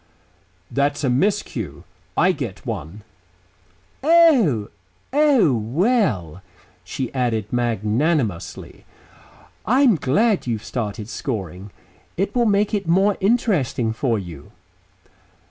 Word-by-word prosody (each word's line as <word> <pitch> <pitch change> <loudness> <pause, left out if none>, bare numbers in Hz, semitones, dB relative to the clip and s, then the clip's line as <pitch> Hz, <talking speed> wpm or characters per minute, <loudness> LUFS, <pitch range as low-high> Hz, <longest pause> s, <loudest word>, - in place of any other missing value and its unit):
"That's 145 +1 0
a 130 - +2
miscue. 125 - -1 0.3
I 185 +2 +4
get 130 - -6
one." 100 - -6 1.0
"Oh!... 270 - +4 0.4
Oh, 275 - +4
well," 115 - 0 0.4
she 130 -3 -5
added 115 -5 -1
magnanimously, 120 - -1 0.8
"I'm 255 -4 +4
glad 195 - +1
you've 110 -3 -3
started 110 -3 -4
scoring. 100 - -5 0.5
It 195 +3 -1
will 240 -2 +2
make 205 0 +1
it 200 -4 -1
more 195 +4 +3
interesting 185 - +1
for 115 0 0
you." 85 -7 -9
130 Hz, 95 wpm, -21 LUFS, -, 1.0 s, I